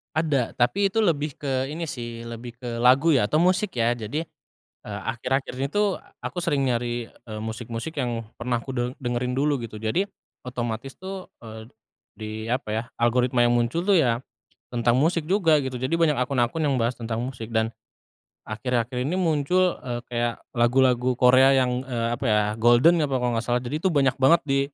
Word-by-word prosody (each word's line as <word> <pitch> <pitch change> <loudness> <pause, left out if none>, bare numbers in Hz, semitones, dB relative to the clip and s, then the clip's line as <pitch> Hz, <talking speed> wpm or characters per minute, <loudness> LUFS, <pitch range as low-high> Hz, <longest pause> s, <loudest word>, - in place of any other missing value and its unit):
Ada, 150 -6 +1
tapi 195 +12 +2
itu 225 - -2
lebih 155 -8 +1
ke 135 -1 -2
ini 165 +2 -4
sih, 120 -3 -6
lebih 120 +1 -8
ke 120 -2 -4
lagu 135 +6 +5
ya 110 -6 +2
atau 155 - +3
musik 185 - +1
ya. 115 +1 +3
Jadi, 120 +8 -4 0.6
eee, 105 -1 -6
akhir-akhir 125 +3 -2
ini 135 +2 -1
tuh 205 -2 +1 0.2
aku 175 -2 -4
sering 140 -4 +1
nyari, 120 -1 -1
eee, 110 -2 -10
musik-musik 115 +6 -5
yang 120 -5 -2
pernah 120 0 -1
ku 130 +2 -7
de 120 0 -1
dengerin 125 0 -2
dulu 145 +3 +1
gitu. 110 -2 -7
Jadi 110 - 0 0.4
otomatis 120 +1 -5
tuh, 190 0 -7
eee, 110 +1 -10 0.5
di 110 0 -5 0.2
apa 125 -3 -2
ya, 110 - -1 0.2
algoritma 120 +1 +2
yang 120 - +2
muncul 145 - 0
tuh 200 - +5
ya 120 -9 +3 0.5
tentang 120 +1 +1
musik 165 +1 +2
juga 165 -4 +3
gitu. 130 -2 -4
Jadi 130 +6 0
banyak 160 -5 +2
akun-akun 125 +2 0
yang 140 - +1
bahas 120 0 -1
tentang 115 0 -3
musik. 125 -3 -6
Dan 110 0 +1 0.8
akhir-akhir 125 +2 -2
ini 170 +8 -1
muncul, 175 +2 +2
eee, 120 -1 -3
kayak 120 -1 -3
lagu-lagu 125 +1 +3
Korea 130 +2 +6
yang, 125 0 0
eee, 120 -3 -2
apa - - -8
ya, 105 -3 +3
Golden 120 +9 +5
apa 135 -3 0
kalau 125 -1 0
nggak 115 - -1
salah. 120 0 +1
Jadi 135 +6 -4
itu 190 - +3
banyak 135 -3 +2
banget 150 +6 +5
di 135 0 +2
125 Hz, 185 wpm, -25 LUFS, 120-150 Hz, 0.8 s, Korea